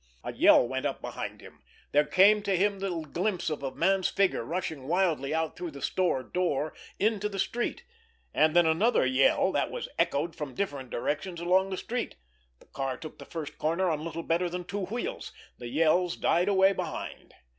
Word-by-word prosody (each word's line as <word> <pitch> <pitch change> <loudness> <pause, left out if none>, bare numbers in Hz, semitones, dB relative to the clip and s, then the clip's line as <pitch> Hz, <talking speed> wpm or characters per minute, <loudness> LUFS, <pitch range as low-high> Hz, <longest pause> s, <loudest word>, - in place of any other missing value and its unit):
A - - -5
yell 120 - +6
went 130 +3 -1
up 135 - -4
behind - - -6
him; - - -15 0.3
there 150 +1 +3
came 205 +3 +5
to 195 -2 0
him 200 +1 +1
the 185 -4 -2
glimpse 175 +4 -2
of 150 - -3
a 135 - -2
man's 190 +6 +2
figure 195 -11 +1
rushing 160 -2 -4
wildly 165 -5 +1
out 160 0 -1
through 175 -1 -5
the 140 -2 -10
store 175 -8 +1
door 155 -2 -1 0.2
into 210 -1 +1
the 200 - -6
street; 240 +5 -2 0.5
and 155 +1 +3
then 175 -1 +6
another 165 - +3
yell, 130 +1 +3
that - - 0
was - - -5
echoed 160 +4 0
from 145 -4 -6
different 145 -10 -3
directions 150 +9 -3
along 185 +3 +2
the 190 - -3
street. 245 +4 -3 0.4
The - - -20
car 135 -2 -4
took 155 - -10
the - - -9
first 150 -3 -7
corner 170 +3 +1
on 155 -1 -2
little 165 0 -5
better 175 +2 0
than 180 +1 -4
two 200 +2 -4
wheels. 360 - -4 0.3
The 120 - -6
yells 165 +6 +2
died 175 +3 +2
away 195 -1 +5
behind. - - -6
175 Hz, 190 wpm, -28 LUFS, 150-190 Hz, 0.5 s, yell